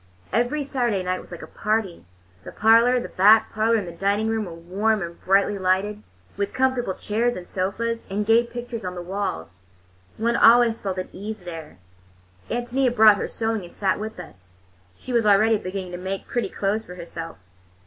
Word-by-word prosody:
Every 245 +6 +1
Saturday 240 -8 -1
night 185 0 -2
was - - -16
like 175 - -8
a - - -6
party. 210 - -2 0.4
The - - -9
parlor, 230 +3 +4
the - - -5
back 210 +4 +4
parlor, 225 +1 +2
and 205 -5 -1
the - - -6
dining 200 +5 0
room 220 -1 -1
were 170 -3 -8
warm 195 +5 -1
and 170 0 -8
brightly 200 +1 +2
lighted, 190 +3 0 0.4
with 200 0 -2
comfortable 255 -6 0
chairs 235 +3 -1
and 180 -1 -8
sofas, 230 +5 -2
and 205 +2 -2
gay 225 +2 +5
pictures 240 -1 -7
on 180 0 -5
the 175 - -6
walls. 170 - -4 0.6
One 235 +2 0
always 235 -1 +5
felt 190 -2 -3
at 185 - -4
ease 215 +2 -7
there. 165 - -9 0.7
Ántonia 245 +1 0
brought 215 -2 +7
her - - -3
sewing 225 -3 -2
and 175 - -11
sat 195 -1 -1
with 220 +1 -6
us—she 90 - -13
was 230 -3 +2
already 215 +2 +4
beginning 185 -1 -5
to 175 - -6
make 190 +1 -4
pretty 240 - -2
clothes 205 +2 -1
for 180 - -11
herself. 165 -1 -8
205 Hz, 185 wpm, -23 LUFS, 185-225 Hz, 0.7 s, brought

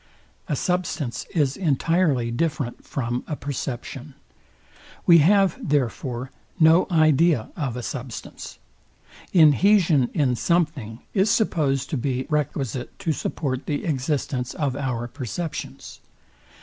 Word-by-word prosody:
A 150 - 0
substance 175 -7 -2
is 145 -5 +1
entirely 155 -6 +1
different 140 -1 -2
from 120 -2 -3
a 150 - -3
perception. 135 0 -6 0.9
We 170 -1 +8
have, 195 +3 +4
therefore, 130 -2 -1 0.3
no 160 +2 +5
idea 155 - +3
of 135 -7 -3
a 125 - -5
substance. 125 -4 -7 0.7
Inhesion 165 - +5
in 135 -5 +2
something 150 -8 -1
is 200 +1 +3
supposed 155 - +1
to 150 - 0
be 130 0 -2
requisite 135 -4 -2
to 165 - -1
support 135 -3 -3
the 145 - -2
existence 135 -4 -2
of 140 -4 -1
our 125 -4 -2
perceptions. 150 +5 -6
145 Hz, 110 wpm, -24 LUFS, 125-165 Hz, 0.9 s, We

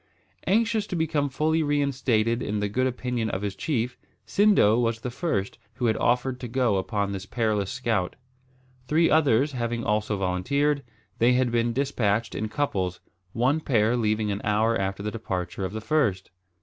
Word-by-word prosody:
Anxious 220 +2 +2
to 185 - -4
become 155 -3 0
fully 155 +4 +1
reinstated 130 -6 +1
in 105 0 -2
the 105 - 0
good 130 +6 0
opinion 125 -2 -2
of 95 0 -3
his 100 -1 -3
chief, 125 -1 -2 0.3
Sindo 195 - +4
was 115 -1 -1
the 125 - -4
first 115 - -2 0.2
who 125 - -2
had 110 - +3
offered 125 +1 +1
to 125 - -5
go 120 -4 +1
upon 100 +1 -1
this 100 0 -5
perilous 110 -4 0
scout. 115 -8 -1 0.7
Three 165 +2 +3
others 145 -3 +3
having 120 -2 -2
also 105 -1 0
volunteered, 140 +11 0 0.4
they 120 +2 +5
had 125 -1 +2
been 120 0 +1
despatched 115 -4 0
in 110 +1 -3
couples, 95 - -1 0.3
one 130 +6 +2
pair 120 -6 +2
leaving 110 -2 0
an 100 - -3
hour 110 +2 +2
after 95 0 -2
the 105 - -2
departure 95 -4 -4
of 95 - -4
the 110 +1 -5
first. 110 -11 0
115 Hz, 170 wpm, -26 LUFS, 105-140 Hz, 0.7 s, they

